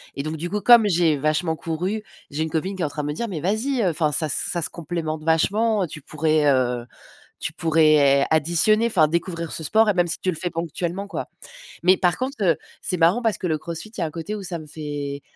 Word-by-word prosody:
et 140 - -3
donc, 155 +1 -4
du 170 +3 -4
coup, 210 - -1
comme 235 -1 +7
j'ai 170 -4 +3
vachement 155 +3 0
couru, 180 +7 -3 0.3
j'ai 150 +2 -1
une 160 - -3
copine 175 +5 -2
qui 190 - -6
est - - +2
en - - -2
train 150 +1 -4
de - - -3
me 150 - -2
dire: 235 +10 -3
«Mais 175 -5 -4
vas-y, 220 - 0
heu, 185 - +3
enfin 155 -2 0
ça 155 +1 +1
ça 170 +4 0
se - - 0
complémente 160 -2 -4
vachement, 205 +7 +2
heu, - - -2
tu 150 - -9
pourrais, 155 +1 0
heu 125 -2 0 0.5
tu - - -3
pourrais 155 -4 +4
additionner, 170 +9 +3
enfin 175 -9 +3
découvrir 170 +1 -3
ce 160 - -5
sport 220 +7 +3
et - - +3
même 175 -1 +2
si 165 - -2
tu 185 - -1
le 180 - -1
fais 175 - -2
ponctuellement 170 +3 -4
quoi». - - -5 0.6
Mais 185 +2 +5
par 180 -2 +1
contre, 265 +2 -3
heu, 170 -4 +3 0.3
c'est 180 - -1
marrant 175 +8 +3
parce 225 -3 0
que - - -4
le 160 -3 0
CrossFit, 170 +6 -7
il 220 - -15
y - - -1
a - - +1
un - - -5
côté 165 +6 -5
où 210 - -6
ça 175 -2 -4
me 155 - -10
fait 145 -2 -5
165 Hz, 255 wpm, -23 LUFS, 155-190 Hz, 0.6 s, comme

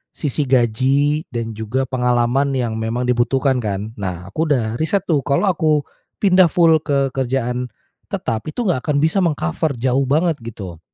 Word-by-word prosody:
sisi 145 -1 -2
gaji 135 +5 +2
dan 115 -3 -4
juga 110 +4 -2
pengalaman 125 +2 +1
yang 115 -3 -1
memang 115 +2 -2
dibutuhkan 125 +2 +2
kan. 105 -1 -3
Nah, 90 -2 -4
aku 160 +8 -1
udah 120 -6 0
riset 185 +4 0
tuh, 155 -4 +1
kalau 140 +5 +1
aku 155 -3 +1 0.4
pindah 185 -2 +6
full 165 -1 +4
ke 140 -3 0
kerjaan 125 -1 -1 0.4
tetap 110 +4 -3
itu 195 +11 -3
nggak 180 - +1
akan 150 -2 +1
bisa 160 +5 +2
meng-cover 150 - 0
jauh 130 +2 0
banget 160 +3 +1
gitu. 100 -7 -8
130 Hz, 160 wpm, -19 LUFS, 115-150 Hz, 0.4 s, pindah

